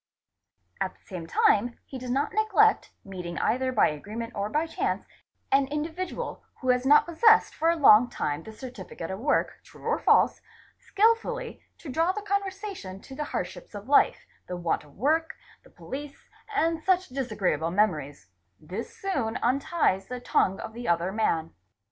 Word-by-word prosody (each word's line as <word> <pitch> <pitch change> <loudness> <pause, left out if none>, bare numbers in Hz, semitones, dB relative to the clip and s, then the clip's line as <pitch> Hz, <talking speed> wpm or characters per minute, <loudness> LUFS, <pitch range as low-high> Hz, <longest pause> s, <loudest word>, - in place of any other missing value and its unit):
At 190 - -2
the - - -32
same 175 -4 -7
time 225 +7 +2
he 265 - -8
does 250 0 -7
not 275 +4 0
neglect, 435 +1 +3
meeting 180 -3 -6
either 260 +2 +1
by 240 - +4
agreement 215 +10 -6
or 200 0 -2
by 305 +7 0
chance 325 - -2 0.5
an 275 0 +4
individual 320 +5 -4 0.2
who 255 - -3
has 250 +1 +2
not 295 +1 +7
possessed 440 +7 +4
for 325 +2 +1
a 335 - +3
long 245 -6 +7
time 150 -9 -2
a - - -7
certificate 215 -8 -8
of 190 - -5
work, 275 - +1
true - - -17
or - - +1
false, - - +4 0.4
skilfully 460 +3 0 0.2
to 310 - -10
draw 330 +6 +2
the 420 +1 -5
conversation 395 - -3
to 270 - -12
the 300 - -3
hardships - - -5
of 205 +2 -8
life, 285 - +4 0.2
the 180 - -4
want 170 -3 -1
of 145 -2 -19
work, 315 - +1 0.3
the - - -19
police, 280 +1 -9 0.3
and 330 -4 +1
such 370 +1 +1
disagreeable 210 - -1
memories; 155 - 0 0.3
this 185 +9 -7
soon 245 -13 -2
unties 250 - +1
the 250 0 -5
tongue 195 -5 +1
of 220 -1 -7
the 240 +1 -6
other 170 +2 +1
man. 165 -6 0
250 Hz, 165 wpm, -27 LUFS, 195-320 Hz, 0.5 s, not